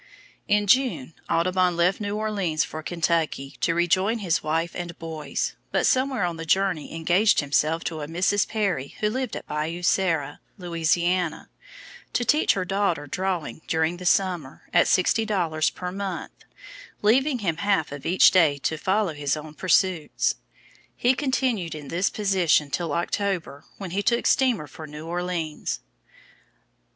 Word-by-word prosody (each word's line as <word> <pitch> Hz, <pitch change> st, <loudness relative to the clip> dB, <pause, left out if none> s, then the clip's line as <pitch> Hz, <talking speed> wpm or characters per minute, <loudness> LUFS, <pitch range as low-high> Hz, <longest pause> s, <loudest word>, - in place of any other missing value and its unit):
In 210 Hz, 0 st, +2 dB
June, 230 Hz, -, +2 dB, 0.2 s
Audubon 180 Hz, +1 st, +2 dB
left 180 Hz, +5 st, +2 dB
New 205 Hz, 0 st, -2 dB
Orleans 200 Hz, -8 st, 0 dB
for 155 Hz, -, -6 dB
Kentucky, 160 Hz, -4 st, -1 dB
to 165 Hz, -, +1 dB
rejoin 185 Hz, +6 st, +2 dB
his 185 Hz, -7 st, 0 dB
wife 165 Hz, +2 st, -1 dB
and 175 Hz, -1 st, -6 dB
boys, 160 Hz, -3 st, -4 dB, 0.2 s
but -, -, +1 dB
somewhere 260 Hz, -5 st, +2 dB
on 175 Hz, -2 st, -1 dB
the 165 Hz, -, -5 dB
journey 190 Hz, -4 st, 0 dB
engaged 180 Hz, +6 st, +3 dB
himself 155 Hz, +3 st, +1 dB
to 160 Hz, -2 st, -4 dB
a 145 Hz, -, -5 dB
Mrs. 185 Hz, +5 st, +1 dB
Perrie 195 Hz, -11 st, -2 dB
who 210 Hz, 0 st, +1 dB
lived 255 Hz, -1 st, -3 dB
at -, -, -6 dB
Bayou 155 Hz, +4 st, -3 dB
Sara, 165 Hz, -6 st, +1 dB, 0.2 s
Louisiana, 175 Hz, 0 st, 0 dB, 0.6 s
to 245 Hz, -, 0 dB
teach 300 Hz, +5 st, +3 dB
her 185 Hz, -2 st, -2 dB
daughter 195 Hz, -6 st, 0 dB
drawing 180 Hz, 0 st, -3 dB
during 160 Hz, +2 st, 0 dB
the 180 Hz, -, -9 dB
summer, 180 Hz, -8 st, 0 dB
at -, -, +5 dB
sixty 195 Hz, +4 st, +3 dB
dollars 170 Hz, -8 st, 0 dB
per 180 Hz, 0 st, -6 dB
month, 195 Hz, -1 st, -6 dB, 0.6 s
leaving 260 Hz, +6 st, +3 dB
him 175 Hz, -8 st, -1 dB
half 195 Hz, -6 st, +1 dB
of 145 Hz, -1 st, -7 dB
each 185 Hz, +2 st, +5 dB
day 160 Hz, -6 st, +4 dB
to 160 Hz, +3 st, -2 dB
follow 195 Hz, -1 st, +1 dB
his 145 Hz, 0 st, -1 dB
own 150 Hz, 0 st, -9 dB
pursuits. 180 Hz, -1 st, +1 dB, 0.6 s
He 245 Hz, +2 st, +3 dB
continued 255 Hz, -, -1 dB
in 145 Hz, -3 st, -8 dB
this 180 Hz, +3 st, +1 dB
position 180 Hz, -8 st, +2 dB
till 165 Hz, -2 st, -2 dB
October 170 Hz, -4 st, -2 dB
when 190 Hz, -4 st, -6 dB
he 195 Hz, +3 st, 0 dB
took 235 Hz, +3 st, +1 dB
steamer 245 Hz, -, +2 dB
for 155 Hz, +2 st, -10 dB
New 150 Hz, +1 st, -9 dB
Orleans. 170 Hz, -2 st, -3 dB
175 Hz, 155 wpm, -25 LUFS, 160-200 Hz, 0.6 s, at